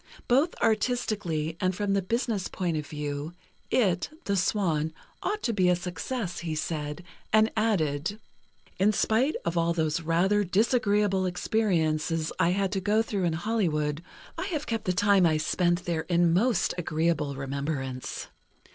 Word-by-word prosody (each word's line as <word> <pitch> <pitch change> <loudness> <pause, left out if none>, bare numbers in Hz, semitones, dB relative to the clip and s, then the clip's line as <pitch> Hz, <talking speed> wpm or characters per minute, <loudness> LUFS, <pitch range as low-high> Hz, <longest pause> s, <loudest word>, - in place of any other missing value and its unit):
Both 275 +7 +3
artistically 210 -9 0
and 185 0 +1
from 205 0 0
the 200 - +2
business 225 0 -1
point 175 -3 -2
of 150 -1 -3
view, 150 +2 -4 0.3
it 185 -8 +2
("The 200 - 0
Swan") 170 -5 +1 0.3
ought 420 +2 -2
to 235 - 0
be 185 -3 +3
a 180 - +4
success, 180 +3 -4
he 165 -2 -3
said, 155 0 -3 0.3
and 220 +1 +4
added: 200 -4 0 0.6
In 205 +3 +4
spite 230 +8 +2
of 170 0 0
all 170 0 +2
those 160 0 0
rather 180 +6 +2
disagreeable 205 -1 +2
experiences 165 -5 0
I 170 - +4
had 195 +1 0
to 195 - 0
go 210 +3 +2
through 200 -5 -1
in 170 - +1
Hollywood, 160 -6 0 0.4
I 370 - -2
have 310 -7 -2
kept 225 -2 -3
the 185 - +2
time 200 -1 +4
I 155 -1 +2
spent 175 +3 +1
there 165 -2 -2
in 170 -1 +3
most 230 +7 +2
agreeable 155 -3 0
remembrance. 135 -1 -4
180 Hz, 155 wpm, -27 LUFS, 160-210 Hz, 0.6 s, a